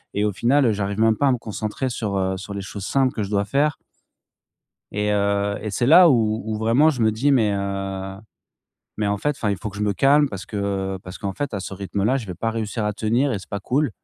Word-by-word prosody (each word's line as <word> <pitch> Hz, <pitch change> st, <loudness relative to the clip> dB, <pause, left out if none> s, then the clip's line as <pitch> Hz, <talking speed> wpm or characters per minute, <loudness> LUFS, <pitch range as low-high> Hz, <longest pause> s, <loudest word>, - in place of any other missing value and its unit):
et 105 Hz, +1 st, +1 dB
au 105 Hz, -, +1 dB
final, 130 Hz, +8 st, +2 dB
heu, 115 Hz, -, +4 dB
j'arrive 100 Hz, +1 st, -3 dB
même 110 Hz, -1 st, +3 dB
pas 145 Hz, -, +2 dB
à 135 Hz, -, +4 dB
me 125 Hz, -, +1 dB
concentrer 110 Hz, +3 st, -4 dB
sur, 105 Hz, -5 st, -2 dB
heu, 95 Hz, 0 st, 0 dB
sur 100 Hz, +1 st, -7 dB
les 100 Hz, -, -3 dB
choses 95 Hz, +1 st, -7 dB
simples 135 Hz, +1 st, +1 dB
que 110 Hz, -, -3 dB
je 100 Hz, -, -3 dB
dois 100 Hz, -1 st, +1 dB
faire. 140 Hz, +7 st, +1 dB, 1.2 s
Et 105 Hz, +1 st, 0 dB
heu 100 Hz, 0 st, +1 dB
et 105 Hz, -, -4 dB
c'est 120 Hz, +5 st, 0 dB
là 175 Hz, +4 st, +8 dB
où 110 Hz, -6 st, +2 dB
où 110 Hz, -1 st, -2 dB
vraiment 115 Hz, +8 st, +3 dB
je 130 Hz, -6 st, -2 dB
me 110 Hz, -1 st, +3 dB
dis: 135 Hz, +7 st, +1 dB
«Mais, 110 Hz, -6 st, +3 dB
heu, 95 Hz, -1 st, -3 dB, 0.8 s
mais 105 Hz, -, 0 dB
en 100 Hz, -, +1 dB
fait, 145 Hz, +9 st, 0 dB
enfin 115 Hz, -7 st, -2 dB
il 100 Hz, -, 0 dB
faut 110 Hz, +4 st, -6 dB
que 100 Hz, -, -12 dB
je -, -, -1 dB
me 105 Hz, -1 st, +1 dB
calme», 140 Hz, +8 st, +4 dB
parce 95 Hz, -4 st, -7 dB
que 100 Hz, -2 st, -3 dB
parce 90 Hz, +1 st, -9 dB
qu'en 100 Hz, -, -3 dB
fait, 135 Hz, +3 st, -4 dB
à 100 Hz, -, -2 dB
ce 95 Hz, -, -7 dB
rythme-là, 100 Hz, +5 st, -1 dB
je 115 Hz, -, -7 dB
vais 90 Hz, -, -5 dB
pas 115 Hz, +5 st, -2 dB
réussir 110 Hz, 0 st, -3 dB
à 105 Hz, -, 0 dB
tenir 120 Hz, +7 st, +1 dB
et 105 Hz, -, -1 dB
c'est 95 Hz, -, -13 dB
pas 100 Hz, -, -4 dB
cool. 135 Hz, +7 st, 0 dB
105 Hz, 260 wpm, -22 LUFS, 100-120 Hz, 1.2 s, là